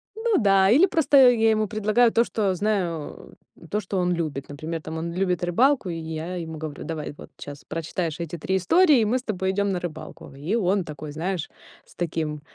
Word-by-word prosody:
Ну 445 -2 +1
да, 195 -3 +4
или 290 - +6
просто 280 -7 +5
я 225 -2 +3
ему 215 -1 +1
предлагаю 215 +3 +2
то, 235 - +3
что 205 -5 -1
знаю, 180 -6 -3 0.4
то 210 - +1
что 195 -1 -4
он 180 0 +1
любит. 155 -5 -3
Например, 155 +3 -5
там 160 +1 -6
он 170 +1 -4
любит 180 -1 -1
рыбалку, 240 +5 +2
и 170 - -3
я 160 +2 -5
ему 160 -2 -6
говорю: 155 -2 -6
"Давай, 155 -3 -5
вот - - -12
щас 145 0 -9
прочитаешь 165 +1 -4
эти 170 0 -5
3 190 +5 -1
истории, 295 - +4
и 220 - +2
мы 230 +4 +1
с 255 - -6
тобой 190 -4 -1
идем 200 +1 0
на 180 - -1
рыбалку". 160 -3 -8
И 155 +10 -2
он 195 -3 +1
такой, 150 0 -8
знаешь, 170 +2 -3 0.4
с - - -21
таким 155 -3 -3
180 Hz, 205 wpm, -24 LUFS, 160-215 Hz, 0.4 s, или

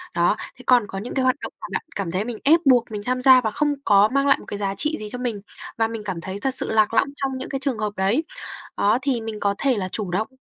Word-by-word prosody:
Đó, 175 +4 +3 0.2
thế 255 - -14
còn 245 -5 +4
có 195 - -5
những 235 - -6
cái 265 - 0
hoạt 255 +1 +3
động - - -6
mà - - -6
bạn - - -2
cảm 190 -4 -3
thấy 190 +4 -1
mình 235 -2 -5
ép 320 +4 +5
buộc 245 -4 +4
mình 210 -1 -4
tham 255 0 -1
gia 260 -1 +7
và 220 -3 -1
không 295 +5 +1
có 205 +1 +5
mang 275 0 +2
lại 275 - +5
một - - -13
cái 205 - -5
giá 195 -1 -2
trị 300 +10 -1
gì 210 -1 -6
cho 250 - -5
mình, 235 -5 -3 0.4
và 225 -1 +2
mình 225 -1 -6
cảm 180 -4 -4
thấy 190 +3 -6
thật 260 +4 -1
sự - - -1
lạc 215 0 +3
lõng 275 - +3
trong 270 -2 -3
những 260 - -6
cái 270 - -3
trường 265 -3 -1
hợp 210 -1 -2
đấy, 205 +11 +1 0.5
đó, 215 +5 +3
thì 255 -4 0
mình 220 -1 -5
có 200 0 +1
thể 270 -4 +1
là 185 -2 -3
chủ 200 -5 -3
động, 215 +5 0
225 Hz, 300 wpm, -23 LUFS, 205-260 Hz, 0.5 s, gia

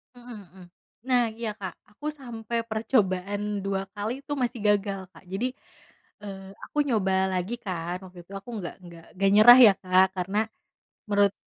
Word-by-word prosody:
Mhm 245 -1 -11
mhm. 185 +1 -15 0.4
Nah, 245 -3 +3
iya 230 -2 -3
Kak. 190 - -5 0.2
Aku 290 +8 -7
sampai 235 -5 -4
percobaan 205 -3 0
2 195 0 -2
kali, 225 +7 -4
itu 290 - -9
masih 250 -4 -1
gagal, 200 -2 +1
Kak. - - -15
Jadi, 245 +6 -1 0.7
eee, 195 -2 -9 0.2
aku - - -12
nyoba 215 -9 +1 0.2
lagi 185 +5 -2
kan, 180 -2 -4
waktu 180 -1 -12
itu 195 - -14
aku 195 +5 -8
nggak 175 - -6
nggak 170 -1 -12
nggak 195 +1 +2
nyerah 240 +4 +10
ya, 195 - +3
Kak. 185 0 +4
Karena 190 +3 -1 0.7
menurut 200 -1 +4
205 Hz, 160 wpm, -26 LUFS, 190-235 Hz, 0.7 s, nyerah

